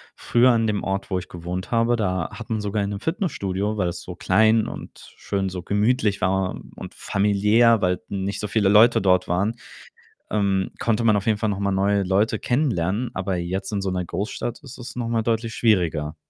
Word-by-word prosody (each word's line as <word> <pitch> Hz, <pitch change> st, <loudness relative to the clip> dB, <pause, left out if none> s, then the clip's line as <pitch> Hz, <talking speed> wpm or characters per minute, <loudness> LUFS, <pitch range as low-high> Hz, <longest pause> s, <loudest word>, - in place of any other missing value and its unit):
früher 125 Hz, +2 st, +3 dB
an 115 Hz, -2 st, +2 dB
dem 105 Hz, -1 st, -1 dB
Ort, 95 Hz, +1 st, -3 dB
wo 95 Hz, -, 0 dB
ich 90 Hz, -, -11 dB
gewohnt 90 Hz, +3 st, -6 dB
habe, 115 Hz, +1 st, +2 dB
da 95 Hz, -6 st, -1 dB
hat 115 Hz, +2 st, -9 dB
man 110 Hz, -1 st, -1 dB
sogar 105 Hz, 0 st, -1 dB
in 100 Hz, -, -2 dB
'nem 100 Hz, -1 st, -4 dB
Fitnessstudio, 110 Hz, -, -2 dB
weil 90 Hz, -3 st, +1 dB
es 85 Hz, -, -6 dB
so 90 Hz, -, -8 dB
klein 110 Hz, +5 st, +3 dB
und -, -, -10 dB
schön, 95 Hz, -1 st, -2 dB
so 90 Hz, -1 st, -6 dB
gemütlich 105 Hz, +2 st, +1 dB
war 95 Hz, 0 st, 0 dB, 0.2 s
und -, -, -9 dB
familiär 105 Hz, +3 st, +3 dB
weil 90 Hz, 0 st, +1 dB
nicht 100 Hz, 0 st, -3 dB
so 105 Hz, -, -3 dB
viele 105 Hz, -2 st, +2 dB
Leute 110 Hz, +4 st, +6 dB
dort 90 Hz, -1 st, +3 dB
waren, 100 Hz, +6 st, 0 dB, 0.8 s
ähm, 100 Hz, -2 st, 0 dB
konnte 115 Hz, 0 st, 0 dB
man 110 Hz, -2 st, +4 dB
auf 100 Hz, -, -1 dB
jeden 110 Hz, -, +3 dB
Fall 110 Hz, 0 st, -1 dB
noch 100 Hz, -1 st, -2 dB
mal 100 Hz, 0 st, 0 dB
neue 100 Hz, +1 st, +1 dB
Leute 100 Hz, +4 st, +1 dB
kennenlernen, 120 Hz, -, 0 dB
aber 95 Hz, 0 st, -2 dB
jetzt 95 Hz, +3 st, -3 dB
in 100 Hz, -2 st, -1 dB
so 95 Hz, -, -2 dB
'ner 90 Hz, -1 st, -2 dB
Großstadt 105 Hz, +6 st, -4 dB
ist 135 Hz, -1 st, -11 dB
es 125 Hz, 0 st, -9 dB
noch 120 Hz, -2 st, -3 dB
mal 115 Hz, -1 st, +1 dB
deutlich 115 Hz, 0 st, -1 dB
schwieriger. 85 Hz, -8 st, +1 dB
100 Hz, 205 wpm, -23 LUFS, 95-115 Hz, 0.8 s, Leute